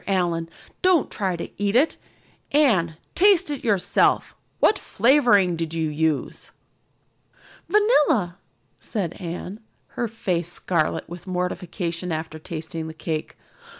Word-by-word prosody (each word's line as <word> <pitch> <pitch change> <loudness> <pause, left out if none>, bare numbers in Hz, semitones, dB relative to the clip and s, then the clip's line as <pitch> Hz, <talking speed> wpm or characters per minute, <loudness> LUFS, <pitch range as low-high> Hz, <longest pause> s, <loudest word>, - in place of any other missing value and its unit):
Allan, 175 -4 0 0.3
don't 370 -5 +3
try 190 -3 -1
to 170 - -5
eat 205 +1 +1
it. 285 +6 +4 0.6
Anne, 195 - +3 0.2
taste 375 -4 +4
it 285 - -5
yourself. 205 -6 +2 0.2
What 425 - +4
flavoring 220 -7 +3
did 165 0 -4
you 160 -1 0
use?" 155 -1 -1 1.2
"Vanilla," 300 - +3 0.4
said 190 -7 -3
Anne, 180 +4 -6 0.3
her 240 - -3
face 180 -6 -2
scarlet 170 -3 -1
with 175 +2 -10
mortification 180 -1 -3
after 160 0 -4
tasting 160 0 -6
the 160 - -8
cake. 160 -1 -4
180 Hz, 115 wpm, -23 LUFS, 165-235 Hz, 1.2 s, it